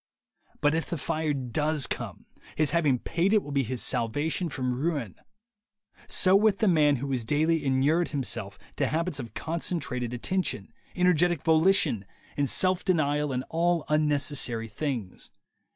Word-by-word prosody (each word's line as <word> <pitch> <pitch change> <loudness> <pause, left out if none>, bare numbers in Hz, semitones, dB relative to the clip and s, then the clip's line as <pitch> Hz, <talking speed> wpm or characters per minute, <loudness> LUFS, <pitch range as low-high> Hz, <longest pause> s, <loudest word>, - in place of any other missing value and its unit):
But 145 +1 +3
if 165 0 -1
the 170 - -2
fire 155 +2 -1
does 145 +3 0
come, - - -6 0.3
his 155 -2 +1
having 155 -6 +2
paid 175 - 0
it 215 - +3
will 145 - -8
be 140 -1 +2
his 125 -1 -3
salvation 145 +9 -1
from 125 -3 -2
ruin. 140 - -2 0.9
So 185 0 +4
with 205 0 +4
the 215 - +1
man 150 -5 +4
who 135 +2 -4
has 125 -3 -1
daily 155 +5 +1
inured 140 +6 +2
himself 140 -5 -2 0.2
to - - +1
habits 165 -1 -1
of 120 -4 -8
concentrated 160 -7 -3
attention, 125 - -2 0.2
energetic 175 -3 +2
volition, 160 - +3 0.3
and 140 -2 0
self 185 -1 +2
denial 150 -5 +1
in 125 0 -2
unnecessary 150 -7 +1
things. 115 -4 -5
150 Hz, 145 wpm, -27 LUFS, 130-170 Hz, 0.9 s, So